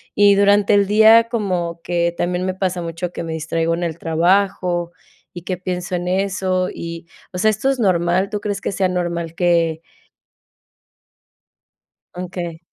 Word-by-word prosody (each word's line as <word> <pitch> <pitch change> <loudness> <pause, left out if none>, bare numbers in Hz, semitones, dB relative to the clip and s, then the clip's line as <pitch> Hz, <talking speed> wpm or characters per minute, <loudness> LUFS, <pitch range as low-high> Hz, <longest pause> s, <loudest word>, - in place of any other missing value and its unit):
Y 205 -1 +5
durante 200 +1 +4
el 200 -1 +3
día 220 +2 +6
como 180 -7 -2
que 170 -1 -1
también 180 +1 -1
me 185 - -1
pasa 185 -2 -2
mucho 170 +1 -4
que - - -5
me 165 -1 -5
distraigo 165 +1 -1
en 175 - -4
el 165 -2 -3
trabajo 175 +1 +1 0.4
y 175 - -8
que 185 0 -3
pienso 180 0 -4
en 175 0 -3
eso 185 -1 0
y, 170 0 -7 0.3
o 180 - -4
sea, 215 - +4
¿esto 215 +6 -1
es 270 -2 -1
normal, 180 0 +1
tú 210 -1 -3
crees 205 -1 -3
que - - -2
sea 190 -1 +1
normal 170 -2 -3
que 165 -2 +1 2.3
Okey. 175 -2 -6
180 Hz, 160 wpm, -19 LUFS, 170-195 Hz, 2.3 s, día